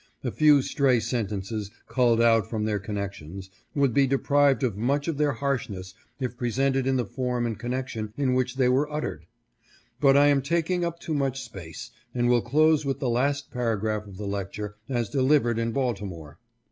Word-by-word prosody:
A - - -1
few 150 -3 +5
stray 135 -5 +2
sen 115 -2 -1
tences, 105 +1 -4 0.2
culled 120 -3 +3
out 115 -2 +4
from 110 -2 -2
their 105 -1 0
connections, 95 -2 -6 0.2
would 140 -4 +2
be 140 +1 +4
deprived 140 -1 +3
of 120 -6 0
much 140 +8 0
of 160 -3 -2
their 145 -2 +2
harshness 115 -9 -3 0.3
if 125 -3 -3
presented 135 +2 0
in 135 - +2
the 125 -2 0
form 125 +1 -2
and 115 -3 -3
connection 120 -3 -4
in 135 -3 +1
which 125 0 0
they 130 -2 +3
were 135 +4 +2
uttered; 85 - -4 0.7
but 135 -1 +5
I 145 - +6
am 140 -1 +3
taking 170 +5 0
up 170 -1 -2
too 160 - -4
much 135 -2 -1
space, 90 -9 -9 0.2
and 120 0 +2
will 120 -1 +4
close 155 +5 +3
with 135 -2 -1
the 130 -2 -1
last 140 +4 0
paragraph 110 -3 -1
of 95 -2 -11
the 105 - -5
lecture, 100 +1 -4
as 120 -4 0
delivered 130 -3 +2
in 115 0 -1
Baltimore. 100 - -3
125 Hz, 185 wpm, -26 LUFS, 105-140 Hz, 0.7 s, I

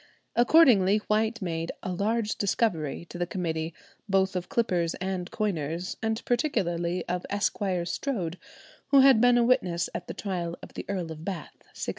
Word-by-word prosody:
Accordingly, 240 - +6
White 220 +1 0
made 165 -2 -2
"a 185 - -3
large 215 +4 0
discovery" 175 -7 0
to 175 - -8
the 175 - 0
committee, 165 -3 -2 0.4
both 190 0 +2
of 180 -1 -3
clippers 175 -8 0
and 185 -1 -3
coiners, 175 -4 -2
and 220 0 -2
particularly 175 - 0
of 180 +1 -2
Esquire 195 -3 0
Strode, 180 -6 -3 0.5
who 275 -1 +6
had 265 -4 +6
been 245 0 +6
a 240 - +4
witness 190 -9 +1
at 175 - -5
the - - -6
trial 175 -4 -3
of - - -11
the - - -7
Earl 180 -5 -2
of 155 0 -8
Bath 185 -5 -5 0.2
(1697). - - -5
190 Hz, 165 wpm, -27 LUFS, 170-220 Hz, 0.5 s, Accordingly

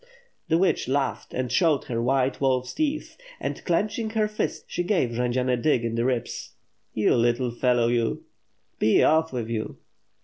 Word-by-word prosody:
The 165 - +3
witch 185 -6 +1
laughed 135 0 -1
and 125 -1 -3
showed 155 -1 +3
her 115 -2 -3
white 130 +2 +1
wolfs 130 -2 +1
teeth; 305 0 -2 0.2
and, - - -4
clenching 210 +5 0
her 215 -1 +1
fist, 215 0 -3
she - - -3
gave 175 - +1
Jendzian 125 +2 0
a 125 - +3
dig 120 -1 +1
in 115 - -2
the 115 +1 0
ribs. 125 -3 -3 0.4
"You 110 - +3
little 120 +1 +1
fellow, 120 0 +2
you." 120 -1 0 0.6
"Be 110 - +4
off 160 +1 +3
with 120 -4 -3
you." 115 -1 -4
130 Hz, 170 wpm, -25 LUFS, 120-160 Hz, 0.6 s, Be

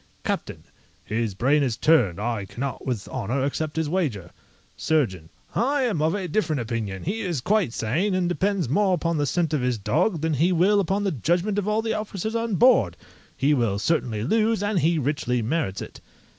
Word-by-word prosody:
CAPTAIN - - -3 0.4
His 110 -2 -2
brain 140 +8 +3
is 125 -5 0
turned; 105 - +3
I 110 -2 -2
cannot 135 +8 -5
with 120 -6 -2
honour 130 +2 -2
accept 150 +2 -2
his 160 -1 0
wager. 140 - -2 0.4
SURGEON 95 - 0 0.2
I 275 +3 +1
am 215 -11 0
of 160 +4 +2
a 190 -3 -3
different 160 -5 0
opinion; 110 -5 -4
he 210 +6 -2
is 175 -8 -2
quite 195 - +1
sane, 160 - 0
and 180 -1 +1
depends 185 -1 0
more 190 - +2
upon 170 0 -1
the 145 -1 0
scent 165 0 0
of 150 - +1
his 125 -1 0
dog 155 - 0
than 160 0 0
he 165 +6 +2
will 185 +4 +4
upon 195 +2 0
the 195 - +1
judgment 175 - 0
of 205 - -3
all 215 +1 +1
the 225 - -1
officers 215 0 -4
on 230 -2 -1
board; 180 - +4 0.4
he 145 +2 +3
will 115 -7 +1
certainly 110 -4 0
lose, 220 - +1
and 205 -2 +1
he 165 +2 +2
richly 125 -4 -1
merits 120 - -1
it. - - -12
155 Hz, 195 wpm, -24 LUFS, 120-195 Hz, 0.4 s, will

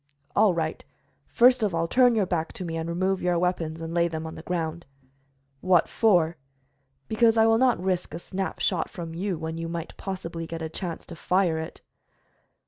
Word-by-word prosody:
"All 205 -4 +4
right. 160 -1 -2 0.4
First 250 +1 +5
of 205 -5 +1
all, 165 0 0
turn 245 +3 +4
your 210 -3 +2
back 165 -3 -2
to 185 - -5
me 165 -1 -4
and 165 0 -3
remove 185 +3 0
your 180 -1 +1
weapons, 170 -2 -1
and 165 0 -5
lay 170 0 +3
them 160 -1 -5
on 160 - -6
the - - -9
ground." 170 -1 -3 0.7
"What 180 -1 +3
for?" 175 -7 +3 0.7
"Because 225 +1 +3
I 220 - +6
will 225 0 +4
not 255 -5 +3
risk 180 -3 -2
a - - -3
snap 190 +2 -4
shot 180 -4 0
from 165 -2 -7
you 185 +1 -2
when 160 +1 -5
you 165 0 -4
might 170 -1 -5
possibly 170 -4 -5
get 165 0 -5
a 160 - -3
chance 170 +1 -5
to 170 - -9
fire 175 -1 +1
it." 160 - -7
175 Hz, 200 wpm, -26 LUFS, 165-195 Hz, 0.7 s, I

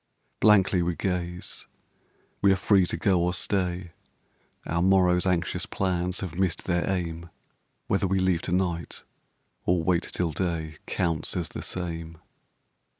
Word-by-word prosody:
Blankly 100 -3 +5
we 85 0 0
gaze. 90 -1 -3 0.7
We 100 - +5
are - - +5
free 95 -1 +3
to - - -2
go 95 -5 +2
or 90 +1 +1
stay; 90 -2 -1 0.7
Our 85 +1 0
morrowŌĆÖs 90 -1 +4
anxious 90 -2 0
plans 90 -1 -1
have 95 -5 -4
missed 90 -3 0
their 90 0 0
aim; 85 -3 -3 0.6
Whether 95 - +1
we 95 +1 +1
leave 95 -2 +2
to 90 - -4
night 90 -2 -1 0.6
or 85 -1 +2
wait 85 0 +2
till 90 -2 -2
day 80 -2 -3
Counts 85 -1 -1
as 85 -4 -2
the - - -6
same. 85 -2 -4
90 Hz, 145 wpm, -27 LUFS, 85-95 Hz, 0.7 s, Blankly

